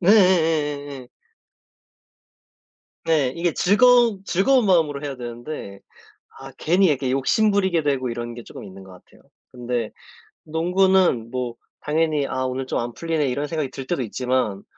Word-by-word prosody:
네예예예예. 160 Hz, -, +2 dB, 2.0 s
네. 150 Hz, -6 st, +1 dB
이게 170 Hz, 0 st, 0 dB
즐거운 230 Hz, +1 st, +4 dB
즐거운 240 Hz, +7 st, +2 dB
마음으로 160 Hz, -6 st, +2 dB
해야 140 Hz, -2 st, -5 dB
되는데 120 Hz, -4 st, -8 dB, 0.6 s
아 135 Hz, 0 st, -10 dB
괜히 180 Hz, +4 st, +2 dB
이렇게 135 Hz, -5 st, 0 dB
욕심 135 Hz, +11 st, +2 dB
부리게 190 Hz, -5 st, +1 dB
되고 135 Hz, -3 st, -1 dB
이런 120 Hz, 0 st, -5 dB
게 120 Hz, -, -9 dB
쪼금 -, -, -11 dB
있는 95 Hz, 0 st, -11 dB
것 95 Hz, -, -14 dB
같아요. 90 Hz, -, -19 dB, 0.3 s
근데 120 Hz, -2 st, -3 dB, 0.5 s
농구는 175 Hz, -6 st, +2 dB
뭐 125 Hz, -2 st, -3 dB, 0.3 s
당연히 150 Hz, -2 st, 0 dB
'아 130 Hz, 0 st, -3 dB
오늘 130 Hz, +1 st, -3 dB
좀 -, -, -1 dB
안 120 Hz, 0 st, -4 dB
풀리네.' 165 Hz, -3 st, -1 dB
이런 140 Hz, +3 st, -2 dB
생각이 155 Hz, -4 st, -3 dB
들 135 Hz, -1 st, -8 dB
때도 170 Hz, -7 st, -1 dB
있지만 125 Hz, -3 st, -2 dB
145 Hz, 305 characters per minute, -22 LUFS, 125-175 Hz, 2.0 s, 즐거운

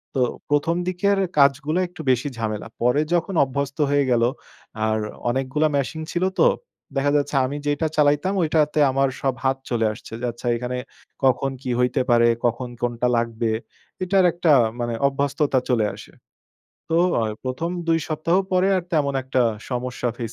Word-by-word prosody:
তো 130 Hz, -, +1 dB, 0.3 s
১ম 145 Hz, +3 st, +2 dB
দিকের 195 Hz, +2 st, +1 dB, 0.2 s
কাজগুলা 140 Hz, +4 st, +3 dB
একটু 175 Hz, -2 st, -10 dB
বেশি 130 Hz, +3 st, 0 dB
ঝামেলা। 110 Hz, -1 st, -3 dB
পরে 125 Hz, +5 st, +3 dB
যখন 175 Hz, +2 st, 0 dB
অভ্যস্ত 140 Hz, +1 st, -3 dB
হয়ে 145 Hz, -1 st, +2 dB
গেল 115 Hz, -1 st, +3 dB, 0.6 s
আর 110 Hz, -, +1 dB, 0.3 s
অনেকগুলা 135 Hz, +5 st, +1 dB
মেশিন 140 Hz, +4 st, -2 dB
ছিল 175 Hz, +1 st, -1 dB, 0.2 s
তো। -, -, +6 dB, 0.5 s
দেখা 145 Hz, +1 st, +2 dB
যাচ্ছে 145 Hz, 0 st, -2 dB
আমি 140 Hz, +3 st, -4 dB
যেইটা 145 Hz, +2 st, 0 dB
চালাইতাম 150 Hz, +5 st, +3 dB
ঐটাতে 155 Hz, -1 st, +1 dB
আমার 135 Hz, 0 st, +2 dB
সব 135 Hz, -1 st, +1 dB
হাত 135 Hz, 0 st, +2 dB
চলে 115 Hz, -2 st, +1 dB
আসছে। 105 Hz, -, -12 dB
যে -, -, -1 dB
আচ্ছা 120 Hz, +1 st, -8 dB
এখানে 125 Hz, +1 st, -3 dB, 0.5 s
কখন 135 Hz, +1 st, +2 dB
কী 130 Hz, -, -2 dB
হইতে 125 Hz, 0 st, +2 dB
পারে, 120 Hz, 0 st, +5 dB, 0.2 s
কখন 120 Hz, +1 st, -1 dB
কোনটা 120 Hz, 0 st, 0 dB
লাগবে। 115 Hz, -1 st, -1 dB, 0.5 s
এটার 190 Hz, 0 st, +3 dB
একটা 170 Hz, -2 st, +2 dB, 0.3 s
মানে 120 Hz, -1 st, -2 dB
অভ্যস্ততা 140 Hz, 0 st, 0 dB
চলে 110 Hz, -4 st, +2 dB
আসে। 105 Hz, -, -13 dB, 0.8 s
তো 165 Hz, -, +4 dB, 0.2 s
আ -, -, +1 dB, 0.2 s
১ম 130 Hz, +7 st, -2 dB, 0.2 s
২ 165 Hz, 0 st, +4 dB
সপ্তাহ 155 Hz, +2 st, +1 dB, 0.2 s
পরে 185 Hz, +1 st, +3 dB
আর 185 Hz, -, -1 dB
তেমন 145 Hz, -3 st, +1 dB
একটা 130 Hz, -1 st, +1 dB, 0.3 s
সমস্যা 125 Hz, 0 st, -2 dB
ফেস 115 Hz, -2 st, -4 dB
140 Hz, 160 wpm, -23 LUFS, 125-155 Hz, 0.8 s, তো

